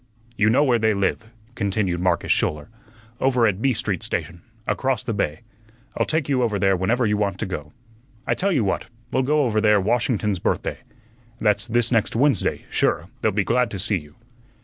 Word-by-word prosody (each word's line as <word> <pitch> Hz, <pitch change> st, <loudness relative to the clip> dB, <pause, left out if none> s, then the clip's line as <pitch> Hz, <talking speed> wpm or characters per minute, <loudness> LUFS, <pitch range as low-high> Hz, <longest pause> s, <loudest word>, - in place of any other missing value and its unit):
"You 110 Hz, -1 st, +3 dB
know 130 Hz, +6 st, +4 dB
where 125 Hz, -5 st, +3 dB
they 110 Hz, -1 st, +2 dB
live," 100 Hz, +3 st, -1 dB, 0.2 s
continued 100 Hz, -5 st, -1 dB
Marcus 90 Hz, -1 st, +1 dB
Schouler. 75 Hz, -1 st, 0 dB, 0.5 s
"Over 125 Hz, -3 st, +3 dB
at 105 Hz, -2 st, 0 dB
B 135 Hz, -, +3 dB
Street 100 Hz, -6 st, -2 dB
station, 85 Hz, 0 st, -3 dB, 0.2 s
across 130 Hz, -1 st, 0 dB
the 120 Hz, -3 st, -2 dB
bay. 80 Hz, -7 st, -2 dB, 0.5 s
I'll -, -, 0 dB
take 160 Hz, -3 st, 0 dB
you 135 Hz, -3 st, +1 dB
over 110 Hz, -4 st, +1 dB
there 95 Hz, 0 st, +3 dB
whenever 115 Hz, +7 st, +1 dB
you 105 Hz, -1 st, +1 dB
want 100 Hz, -1 st, -1 dB
to -, -, -3 dB
go. 75 Hz, -6 st, -6 dB, 0.5 s
I -, -, +1 dB
tell 195 Hz, +2 st, 0 dB
you 140 Hz, -, +2 dB
what, 95 Hz, -, -1 dB, 0.3 s
we'll 130 Hz, -, +2 dB
go 150 Hz, +3 st, +2 dB
over 110 Hz, -3 st, +1 dB
there 105 Hz, -1 st, +4 dB
Washington's 105 Hz, -2 st, 0 dB
Birthday. -, -, -2 dB, 0.6 s
That's 105 Hz, 0 st, +1 dB
this 120 Hz, 0 st, +2 dB
next 115 Hz, -2 st, +1 dB
Wednesday; 135 Hz, -3 st, +1 dB
sure, -, -, 0 dB
they'll -, -, +2 dB
be 100 Hz, +1 st, +1 dB
glad 125 Hz, +4 st, +1 dB
to 100 Hz, -, -5 dB
see 100 Hz, +1 st, 0 dB
you." 75 Hz, -1 st, -16 dB
110 Hz, 195 wpm, -23 LUFS, 95-125 Hz, 0.6 s, know